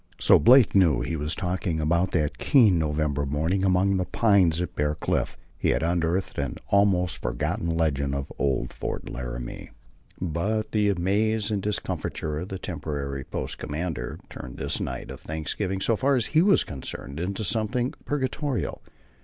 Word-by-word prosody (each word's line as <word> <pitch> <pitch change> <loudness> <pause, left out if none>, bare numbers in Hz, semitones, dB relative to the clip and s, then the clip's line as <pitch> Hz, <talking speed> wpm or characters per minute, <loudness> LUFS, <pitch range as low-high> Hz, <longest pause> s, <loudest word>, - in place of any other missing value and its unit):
So - - +6
Blake 125 0 +6
knew 85 -9 +5
what - - -2
he 80 - -2
was 75 +1 -1
talking 90 -2 -2
about 85 +4 +2
that 75 -3 0
keen 110 - +5
November 75 -2 0
morning 80 +7 0
among 95 +1 +3
the 90 - 0
pines 95 -7 +3
at 90 -2 -3
Bear 75 0 0
Cliff. 75 - -1 0.2
He - - +1
had - - +1
unearthed 85 +2 0
an - - -2
almost 95 -4 +2
forgotten 85 - -2
legend 70 -4 0
of 70 0 -4
old 65 -3 0
Fort - - -5
Laramie. - - -6 0.5
But 105 +6 -1
the 105 -2 +2
amaze 105 +4 +1
and 100 -2 0
discomfiture 80 -6 -3
of 90 +4 -6
the 95 - -4
temporary 70 -6 -4
post - - -5
commander 80 +2 -4
turned - - -9
this - - 0
night - - -4
of - - -9
thanksgiving, 90 +5 -3
so 115 +4 +2
far 135 +5 +2
as 120 -4 +2
he 155 - +6
was 195 +1 +5
concerned, 70 0 -7
into 95 +5 -2
something 120 +5 0
purgatorial. 140 -1 -2
90 Hz, 165 wpm, -26 LUFS, 75-105 Hz, 0.5 s, So